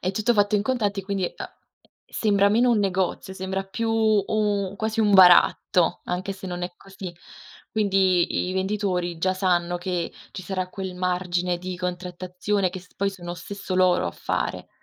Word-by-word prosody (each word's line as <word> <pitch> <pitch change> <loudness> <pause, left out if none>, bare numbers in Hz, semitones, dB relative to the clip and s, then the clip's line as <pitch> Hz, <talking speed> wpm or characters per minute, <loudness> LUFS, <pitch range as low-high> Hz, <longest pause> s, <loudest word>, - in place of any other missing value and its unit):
è 185 - -1
tutto 215 +5 +1
fatto 205 -1 +2
in 205 - +3
contanti 215 -4 0
e, - - -17
quindi, 195 -1 -1
uhm, - - -5 0.6
sembra 200 -2 +2
meno 240 +4 +3
un 225 - +3
negozio, 190 -1 -1
sembra 190 +1 -3
più 225 +4 -3
u 210 -2 +1
quasi 220 +2 -1
un 210 -2 +3
baratto, 180 -1 +5
anche 185 +3 -3
se 190 0 -9
non 175 -1 -5
è 175 0 -3
così. 195 -2 -9 0.6
Quindi 190 -4 +2
i - - -2
venditori 190 -3 -1
già 185 +3 +1
sanno 175 -2 +1
che 175 -1 -3 0.2
ci 190 - -7
sarà 185 0 -3
quel 190 -2 -5
margine 180 -1 -1
di 180 +1 -5
contrattazione 180 +2 -2
che 185 - -7
s 180 - -21
poi 200 0 0
sono 175 -3 -7
stesso 190 +2 -6
loro 185 - +3
a - - -2
fare. - - -3
190 Hz, 175 wpm, -24 LUFS, 180-200 Hz, 0.6 s, baratto